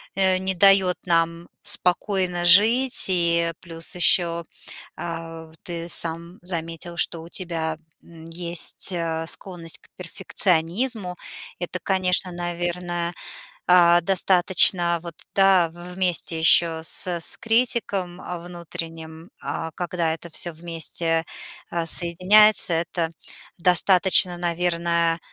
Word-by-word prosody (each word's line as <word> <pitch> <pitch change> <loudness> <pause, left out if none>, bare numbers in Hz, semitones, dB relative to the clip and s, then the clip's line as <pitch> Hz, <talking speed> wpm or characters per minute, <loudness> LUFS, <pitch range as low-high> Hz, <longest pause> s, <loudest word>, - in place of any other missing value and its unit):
э, 190 -1 +3
не 190 0 -1
дает 190 0 +4
нам 170 0 0 0.2
спокойно 180 -1 +1
жить, 225 +9 +4
и 170 -2 +1
плюс 165 0 -3
еще, 170 -1 +2 0.5
э, 165 -1 -8
ты 170 -1 -6
сам 170 +2 +1
заметил, 170 -1 -4
что 165 -1 +1
у 170 - -13
тебя, 165 -4 -4 0.3
м, 165 -1 -15
есть, 170 +2 0
э, 165 -2 -3
склонность 170 -3 -2
к - - -24
перфекционизму. 185 +3 0 0.4
Это, 180 +1 -5
конечно, 185 -1 0
наверное, 175 0 -3 0.6
э, 175 -1 +5
достаточно, 180 -1 +2
вот, 170 -2 -9 0.2
да, 195 -3 +4
вместе 175 -1 -3
еще 160 0 +3
с 165 - +2
с 170 -2 0
критиком, 225 -6 -1
э, 180 -1 -7
внутренним, 165 -1 -8
э, 165 -1 -5
когда 175 -2 -2
это 165 +1 -10
всё 170 +1 +1
вместе, 165 0 -2 0.5
э, 170 -1 -3
соединяется, 185 +4 +3
это, 165 0 -2 0.5
достаточно, 180 0 +4
наверное, 170 -1 -1
175 Hz, 110 wpm, -22 LUFS, 165-180 Hz, 0.6 s, э